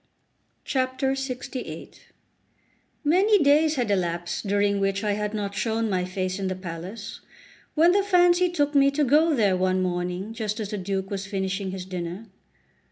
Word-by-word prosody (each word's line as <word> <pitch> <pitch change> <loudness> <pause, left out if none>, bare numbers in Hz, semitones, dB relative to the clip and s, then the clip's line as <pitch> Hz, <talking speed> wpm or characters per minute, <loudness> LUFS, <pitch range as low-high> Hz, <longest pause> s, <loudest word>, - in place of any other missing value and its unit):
LXVIII 260 -1 -3 1.1
MANY 380 +5 +4
days 300 +2 +4
had 245 -6 0
elapsed 175 0 -2
during 200 0 +2
which 195 +1 0
I 210 - +1
had 210 +1 -2
not 200 -1 -3
shown 225 0 -1
my 180 -1 0
face 185 +1 -3
in 195 - -2
the 185 - -2
palace, 180 +3 -7 0.6
when 330 +3 +5
the 400 +2 +3
fancy 360 -2 +4
took 295 -4 0
me 275 -1 +5
to 290 +2 0
go 300 +4 +4
there 205 -6 +3
one 185 0 +1
morning 180 +3 -3
just 220 -1 -3
as 210 -2 -4
the 210 - -3
Duke 195 +1 -3
was 195 -1 -4
finishing 190 -1 -2
his 185 -1 -6
dinner. 180 +2 -5
205 Hz, 160 wpm, -25 LUFS, 185-275 Hz, 1.1 s, when